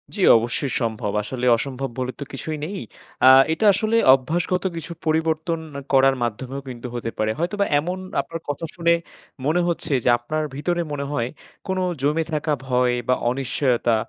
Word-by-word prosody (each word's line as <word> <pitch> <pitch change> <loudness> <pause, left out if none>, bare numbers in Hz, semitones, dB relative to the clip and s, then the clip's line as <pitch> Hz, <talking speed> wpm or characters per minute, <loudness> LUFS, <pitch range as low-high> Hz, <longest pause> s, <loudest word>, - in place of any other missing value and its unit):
জ্বি, 200 - 0 0.2
অবশ্যই 120 +4 -1
সম্ভব। 110 -3 -2
আসলে 125 +3 -4
অসম্ভব 135 +1 -3
বলে 130 0 -2
তো - - -3
কিছুই 155 +3 -4
নেই। 190 +4 -5 0.5
আ - - +9 0.3
এটা 215 - -1
আসলে 215 +3 0 0.2
অভ্যাসগত 165 +7 0
কিছু 165 +1 -6
পরিবর্তন 160 +1 0 0.3
করার 135 0 +5
মাধ্যমেও 130 +4 -4
কিন্তু 125 0 -7
হতে 115 -1 -3
পারে। 110 0 +1
হয়তোবা 200 +4 0
এমন 180 +5 -3 0.2
আপনার 165 - -7
কথা 145 +3 -3
শুনে 170 -1 +3 0.5
মনে 165 +5 +2
হচ্ছে, 165 -3 -1
যে - - +3
আপনার 155 +6 -2
ভিতরে 175 +4 -1
মনে 140 -1 -3
হয়, 120 -5 -1 0.4
কোনো 190 0 -1 0.2
জমে 150 +4 +1
থাকা 155 0 -1 0.2
ভয় 125 -1 +2
বা 130 - +4 0.2
অনিশ্চয়তা 125 -2 +1
145 Hz, 160 wpm, -22 LUFS, 125-165 Hz, 0.5 s, আ